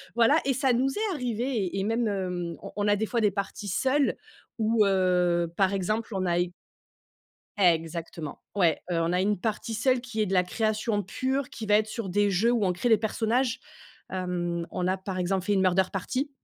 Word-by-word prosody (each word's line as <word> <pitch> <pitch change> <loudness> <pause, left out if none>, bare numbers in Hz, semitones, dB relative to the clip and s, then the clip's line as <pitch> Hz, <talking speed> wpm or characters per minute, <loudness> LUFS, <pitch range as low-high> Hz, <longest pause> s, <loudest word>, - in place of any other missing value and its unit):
voilà 240 +6 +5
et 270 - +2
ça 260 0 +2
nous 255 +3 +2
est 415 +6 -1
arrivé 245 -6 -3
et 205 -8 -1
et - - 0
même, 225 +2 0 0.6
on - - -7
on 205 0 0
a 205 - +4
des 220 - -1
fois 235 +1 -1
des 210 - +4
parties 200 +1 -4
seules 265 +8 +1 0.4
où, 220 -1 +3
heu, 180 -3 +2
par 195 0 +3
exemple, 215 +4 -1
on 185 - -1
a 175 -1 +1
eu 175 0 -2 1.1
exactement, 165 -3 0 0.2
ouais. 175 -6 +3
Heu, 165 - +1
on 165 - 0
a 180 - +1
une 205 0 +1
partie 220 +2 -3
seule, 255 +3 +2
qui 225 -3 -3
est - - +2
de 195 - -3
la 180 -1 +4
création 215 +1 -1
pure, 260 +7 -2
qui 220 - -7
va 210 - +4
être 215 +1 +2
sur 220 -2 -5
des 205 +2 +2
jeux 220 +6 +3
où 225 -5 +2
on 180 - +2
crée 215 +8 -1
des 220 - +6
personnages. 225 +3 0 0.5
Hem, 175 -2 -2
on 180 0 -1
a, 185 - +1
par 190 0 -5
exemple, 185 +1 -1
fait 205 - +2
une 195 - +2
murder 185 0 +4
party. 255 +9 -2
205 Hz, 210 wpm, -27 LUFS, 185-230 Hz, 1.1 s, des